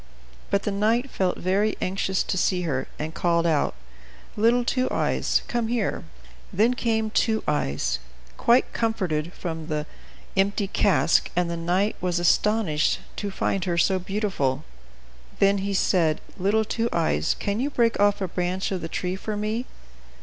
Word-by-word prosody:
But 200 Hz, -, +1 dB
the 210 Hz, -, -1 dB
knight 225 Hz, +6 st, +1 dB
felt 185 Hz, -2 st, 0 dB
very 200 Hz, +4 st, +1 dB
anxious 190 Hz, 0 st, 0 dB
to -, -, -2 dB
see 180 Hz, 0 st, +1 dB
her, 135 Hz, -5 st, -2 dB
and 155 Hz, +1 st, -4 dB
called 170 Hz, -1 st, +1 dB
out, 155 Hz, -, +1 dB, 0.6 s
"Little 235 Hz, +3 st, +3 dB
Two 255 Hz, +1 st, +1 dB
Eyes, -, -, +1 dB
come 235 Hz, -2 st, -1 dB
here." 230 Hz, -3 st, -1 dB, 0.5 s
Then 225 Hz, +6 st, +3 dB
came 220 Hz, -3 st, 0 dB
Two 220 Hz, -1 st, +1 dB
Eyes, 70 Hz, -, 0 dB, 0.4 s
quite 240 Hz, +2 st, +3 dB
comforted, 180 Hz, -8 st, -1 dB
from 160 Hz, -4 st, -5 dB
the 150 Hz, -2 st, -2 dB, 0.5 s
empty 200 Hz, +1 st, +1 dB
cask, 170 Hz, -6 st, +2 dB
and 175 Hz, -1 st, +1 dB
the -, -, -2 dB
knight 180 Hz, +5 st, 0 dB
was 180 Hz, -1 st, 0 dB
astonished 175 Hz, -2 st, +2 dB, 0.2 s
to 205 Hz, -, -3 dB
find 190 Hz, -1 st, -1 dB
her 175 Hz, -2 st, -1 dB
so 190 Hz, +2 st, +3 dB
beautiful. 185 Hz, -8 st, -1 dB, 0.7 s
Then 200 Hz, 0 st, +3 dB
he 200 Hz, +1 st, -2 dB
said: 165 Hz, -5 st, +2 dB, 0.2 s
"Little 210 Hz, +3 st, +1 dB
Two 230 Hz, +2 st, -1 dB
Eyes, 155 Hz, -, +1 dB
can 200 Hz, +2 st, -2 dB
you 275 Hz, +4 st, 0 dB
break 235 Hz, -5 st, +1 dB
off 205 Hz, 0 st, +3 dB
a 190 Hz, -, 0 dB
branch 180 Hz, +2 st, -2 dB
of 185 Hz, -2 st, -2 dB
the 165 Hz, -, -5 dB
tree 180 Hz, +2 st, -2 dB
for 210 Hz, +2 st, -4 dB
me?" 215 Hz, +4 st, -2 dB
195 Hz, 160 wpm, -25 LUFS, 170-215 Hz, 0.7 s, Little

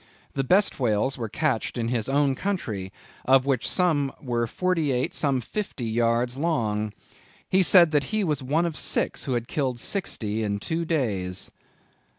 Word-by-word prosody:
The 135 Hz, -, 0 dB
best 190 Hz, +8 st, +3 dB
whales 120 Hz, +2 st, +1 dB
were 115 Hz, -4 st, -4 dB
catched 135 Hz, -2 st, -1 dB
in 115 Hz, -1 st, -1 dB
his 120 Hz, -1 st, -1 dB
own 140 Hz, 0 st, +3 dB
country, 120 Hz, -, -3 dB, 0.3 s
of 130 Hz, 0 st, +5 dB
which 135 Hz, -4 st, 0 dB
some 155 Hz, -7 st, +2 dB
were 120 Hz, -3 st, -1 dB
forty 165 Hz, +1 st, 0 dB
eight, 125 Hz, 0 st, 0 dB
some 135 Hz, -4 st, +1 dB
fifty 145 Hz, -, -4 dB
yards 120 Hz, +3 st, +1 dB
long. 110 Hz, -10 st, 0 dB, 0.6 s
He 190 Hz, -, +3 dB
said 175 Hz, -3 st, +6 dB
that 145 Hz, -2 st, +2 dB
he 215 Hz, -1 st, -1 dB
was 150 Hz, -6 st, 0 dB
one 150 Hz, +6 st, +1 dB
of 165 Hz, -3 st, -2 dB
six -, -, -1 dB
who 135 Hz, -, -1 dB
had 120 Hz, -1 st, -2 dB
killed 130 Hz, -5 st, -1 dB
sixty 110 Hz, -, -2 dB
in 100 Hz, -2 st, -1 dB
two 160 Hz, +10 st, -2 dB
days." 100 Hz, -, -2 dB
130 Hz, 165 wpm, -25 LUFS, 115-160 Hz, 0.6 s, said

